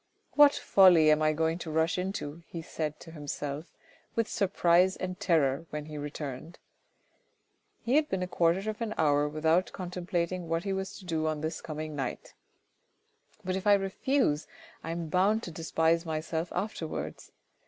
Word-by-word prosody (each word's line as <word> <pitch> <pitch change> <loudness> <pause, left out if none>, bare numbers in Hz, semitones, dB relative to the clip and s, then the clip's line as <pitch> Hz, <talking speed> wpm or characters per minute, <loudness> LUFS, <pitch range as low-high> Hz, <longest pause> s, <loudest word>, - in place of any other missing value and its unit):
" - - -45
What 290 -1 +6
folly 175 -5 +6
am 155 0 +3
I 155 0 +4
going 160 +2 0
to 170 - -6
rush 160 +3 +1
into," 175 -4 -4
he 165 -1 -7
said 155 -1 -4
to 165 - -11
himself 145 0 -5 0.5
with 230 -1 +1
surprise 185 -2 +3
and 185 0 -5
terror 160 -2 +1
when 150 0 -5
he 155 0 -9
returned. 145 +2 -6 1.3
He 250 +5 +3
had 305 -1 +2
been 190 -1 -1
a - - -3
quarter 180 +3 +1
of 215 +1 -4
an 220 -2 -2
hour 145 -1 +3
without 160 +4 +1
contemplating 180 -1 -3
what 165 +1 0
he 195 - -1
was 190 0 -4
to 190 - -13
do 160 -2 -1
on 155 -1 -2
this 160 +1 -3
coming 155 -1 -5
night. 135 -3 -5 0.5
" - - -35
But 185 0 -1
if 190 +2 -3
I 205 - +8
refuse, 195 - 0 0.4
I 165 - -5
am 165 0 -3
bound 200 +7 +2
to 175 - -6
despise 165 +1 +1
myself 160 +1 -3
afterwards. 180 -4 -4
165 Hz, 175 wpm, -29 LUFS, 155-185 Hz, 1.3 s, I